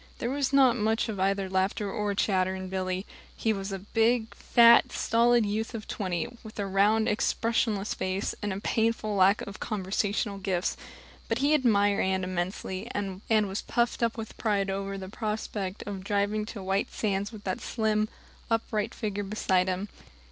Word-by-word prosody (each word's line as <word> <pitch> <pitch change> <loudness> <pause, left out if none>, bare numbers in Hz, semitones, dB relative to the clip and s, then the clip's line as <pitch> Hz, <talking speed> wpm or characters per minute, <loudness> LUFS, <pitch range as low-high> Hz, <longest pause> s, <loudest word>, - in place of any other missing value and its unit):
There 240 - -2
was 275 -1 0
not 265 -3 +5
much 220 +1 +1
of 205 -3 -4
either 195 0 +1
laughter 190 +2 0
or 205 -1 -1
chatter 190 -2 +1
in 185 0 -6
Billy. 185 0 -2 0.3
He 220 - +1
was 195 0 -4
a 195 - -2
big, 225 +3 +1
fat, 235 0 +6
stolid 235 0 +3
youth 220 +3 -2
of 215 - -6
twenty, 180 -5 -2
with 220 -1 -11
a 205 - -1
round, 205 +3 +3
expressionless 220 -1 0
face, 190 +2 -2
and 210 - -2
a 190 - -3
painful 220 0 0
lack 195 +1 +4
of 200 0 -8
conversational 200 0 -1
gifts. 185 -2 -1 0.5
But 225 - +1
he 285 +4 +3
admired 205 -8 +3
Anne 190 0 0
immensely, 185 +1 -3
and 195 -2 -4
was 210 -3 +2
puffed 240 0 0
up 235 0 +1
with 225 -1 -7
pride 200 -3 +1
over 195 0 -3
the 190 -1 -6
prospect 210 -2 -4
of 195 -2 -5
driving 205 +1 0
to 205 -3 -7
White 195 +2 0
Sands 200 -1 -1
with 215 -3 -10
that 185 - -3
slim, 215 -1 0 0.4
upright 225 -1 -1
figure 205 -3 -3
beside 190 -2 +1
him. 185 +2 -2
205 Hz, 170 wpm, -28 LUFS, 195-220 Hz, 0.5 s, fat